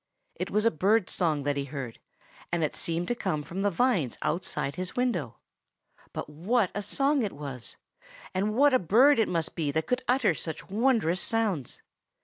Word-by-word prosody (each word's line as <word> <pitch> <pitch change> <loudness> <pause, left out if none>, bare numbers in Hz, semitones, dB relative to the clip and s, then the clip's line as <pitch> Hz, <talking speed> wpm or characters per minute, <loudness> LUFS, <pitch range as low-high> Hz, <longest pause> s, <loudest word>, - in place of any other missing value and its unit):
It - - -4
was 210 +1 +1
a 230 - +5
bird's 195 +5 +2
song 155 -5 +1
that 145 0 0
he 140 - -1
heard, 135 -5 -6 0.5
and 170 -1 +1
it 150 - -1
seemed 170 +1 -2
to - - +2
come 180 -10 -2
from 175 +6 -5
the 205 - +3
vines 195 - +1
outside 155 -4 -1
his 185 +4 -4
window. 175 - -1 0.7
But - - -5
what 185 +8 0
a 205 - -2
song 275 +7 +2
it 210 -4 -2
was! 140 -5 -7 0.6
And 205 +3 0
what 285 +2 +5
a 255 - +5
bird 240 - +5
it 225 - +3
must 165 -2 -1
be 155 -4 -1
that 160 +3 0
could 250 0 -1
utter 250 -7 +3
such 160 0 -5
wondrous 215 -6 +2
sounds! 210 - -1
185 Hz, 185 wpm, -28 LUFS, 155-230 Hz, 0.7 s, a